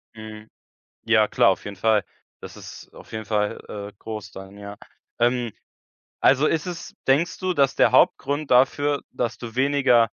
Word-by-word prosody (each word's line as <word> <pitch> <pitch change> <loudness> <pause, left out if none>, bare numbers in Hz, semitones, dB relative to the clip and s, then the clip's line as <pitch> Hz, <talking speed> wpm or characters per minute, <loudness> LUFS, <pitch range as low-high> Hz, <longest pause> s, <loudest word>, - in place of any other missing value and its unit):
Mhm. 110 0 -10 0.6
Ja 110 -2 +3
klar, 100 - +4
auf 95 - -3
jeden 100 -1 -7
Fall. 110 0 +2 0.4
Das - - -10
ist - - -12
auf - - -15
jeden 110 0 -5
Fall, 105 -1 -1
äh, 100 0 -7
groß 110 -1 -7
dann, 95 +1 -11
ja. 100 0 -9 0.4
Ähm, 120 -2 +1 0.7
also 140 +3 +4
ist 165 +3 -1
es 175 -2 -7
denkst 150 +6 +2
du, 185 -1 -1
dass 140 -4 +2
der - - +4
Hauptgrund 145 -1 +2
dafür, 140 +3 +3
dass 120 -1 -3
du 120 -1 -9
weniger 135 -2 +3
120 Hz, 165 wpm, -23 LUFS, 105-140 Hz, 0.7 s, klar